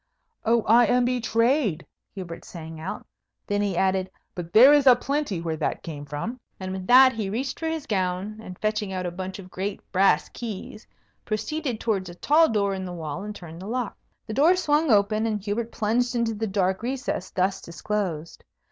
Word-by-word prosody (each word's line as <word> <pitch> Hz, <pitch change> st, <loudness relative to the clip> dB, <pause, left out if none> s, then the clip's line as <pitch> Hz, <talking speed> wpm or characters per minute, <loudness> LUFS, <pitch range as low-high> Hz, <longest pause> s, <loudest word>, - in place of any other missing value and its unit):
"Oh, 230 Hz, 0 st, +3 dB
I 235 Hz, +1 st, +5 dB
am 245 Hz, +2 st, +3 dB
betrayed!" 235 Hz, -, +1 dB, 0.3 s
Hubert 180 Hz, -4 st, -7 dB
sang 160 Hz, -2 st, -9 dB
out. 165 Hz, +4 st, -6 dB, 0.4 s
Then 205 Hz, -1 st, 0 dB
he 200 Hz, -4 st, -1 dB
added, 190 Hz, 0 st, +1 dB, 0.2 s
"But 175 Hz, -2 st, -7 dB
there 255 Hz, +9 st, +8 dB
is 290 Hz, -2 st, +4 dB
a 250 Hz, -, +9 dB
plenty 275 Hz, -, -2 dB
where 165 Hz, -2 st, -3 dB
that 155 Hz, -, -2 dB
came 145 Hz, -3 st, -7 dB
from." 150 Hz, -, -5 dB, 0.2 s
And 185 Hz, -1 st, -5 dB
with 190 Hz, -1 st, -5 dB
that 260 Hz, +1 st, +8 dB
he 215 Hz, -4 st, -3 dB
reached 255 Hz, +6 st, -3 dB
for 325 Hz, -, -2 dB
his 320 Hz, -2 st, -3 dB
gown, 190 Hz, +1 st, -2 dB
and, 185 Hz, -4 st, -9 dB
fetching 215 Hz, -2 st, -1 dB
out 185 Hz, -1 st, -3 dB
a 175 Hz, -, -2 dB
bunch 185 Hz, +1 st, -6 dB
of 185 Hz, -2 st, -11 dB
great 195 Hz, +2 st, -3 dB
brass 195 Hz, +1 st, +3 dB
keys, 215 Hz, -1 st, -7 dB, 0.4 s
proceeded 250 Hz, +2 st, -3 dB
towards 195 Hz, -5 st, -1 dB
a 175 Hz, -, -10 dB
tall 315 Hz, -, +4 dB
door 200 Hz, -3 st, +1 dB
in 190 Hz, -1 st, -4 dB
the 180 Hz, -, -6 dB
wall, 160 Hz, -1 st, -5 dB
and 210 Hz, +1 st, -6 dB
turned 170 Hz, -2 st, -10 dB
the 190 Hz, -, -7 dB
lock. 245 Hz, 0 st, -2 dB, 0.3 s
The 220 Hz, -, -5 dB
door 310 Hz, +10 st, +5 dB
swung 305 Hz, -3 st, +1 dB
open, 215 Hz, +1 st, +3 dB
and 215 Hz, -2 st, -1 dB
Hubert 215 Hz, +3 st, -3 dB
plunged 240 Hz, +3 st, 0 dB
into 230 Hz, -1 st, +1 dB
the 220 Hz, +1 st, -3 dB
dark 190 Hz, -1 st, 0 dB
recess 255 Hz, -6 st, -3 dB
thus 190 Hz, +1 st, 0 dB
disclosed. 170 Hz, -2 st, -4 dB
210 Hz, 195 wpm, -25 LUFS, 185-240 Hz, 0.4 s, a